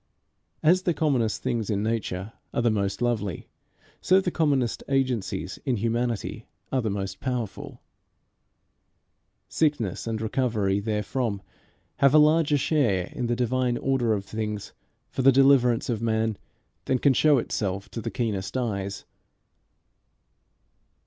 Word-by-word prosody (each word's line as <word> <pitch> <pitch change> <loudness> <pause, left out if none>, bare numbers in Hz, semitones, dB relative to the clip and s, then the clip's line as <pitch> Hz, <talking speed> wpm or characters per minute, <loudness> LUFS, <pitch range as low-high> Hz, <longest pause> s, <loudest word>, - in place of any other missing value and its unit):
As 175 +4 +5
the 175 -3 0
commonest 130 -9 0
things 115 -2 -1
in 105 -1 0
nature 110 -3 -3 0.2
are 120 - +1
the 120 - +3
most 100 +1 -1
lovely, 105 -6 -2 0.5
so 185 +1 +5
the 185 -2 -1
commonest 140 -9 +1
agencies 125 - -1
in 130 -4 0
humanity 115 0 -2 0.2
are 130 - +1
the 110 - -1
most 95 -1 -4
powerful. 125 -6 -4 1.6
Sickness 135 - 0
and 110 -1 -2
recovery 110 -4 0
therefrom 105 0 -2 0.5
have 140 +1 +4
a - - +9
larger 155 0 +4
share 120 - +1
in 120 - -2
the 120 - 0
divine 125 0 0
order 130 -4 +1
of 100 -2 -3
things 105 -1 -4 0.4
for - - -2
the 135 +1 +7
deliverance 130 -3 +4
of 115 -3 -2
men 110 -1 0 0.5
than 130 - +1
can 135 +2 +3
show 150 +3 +4
itself 100 -4 -2
to 115 - -6
the - - -3
keenest 100 -3 -2
eyes. 100 -5 -3
115 Hz, 135 wpm, -26 LUFS, 105-135 Hz, 1.6 s, a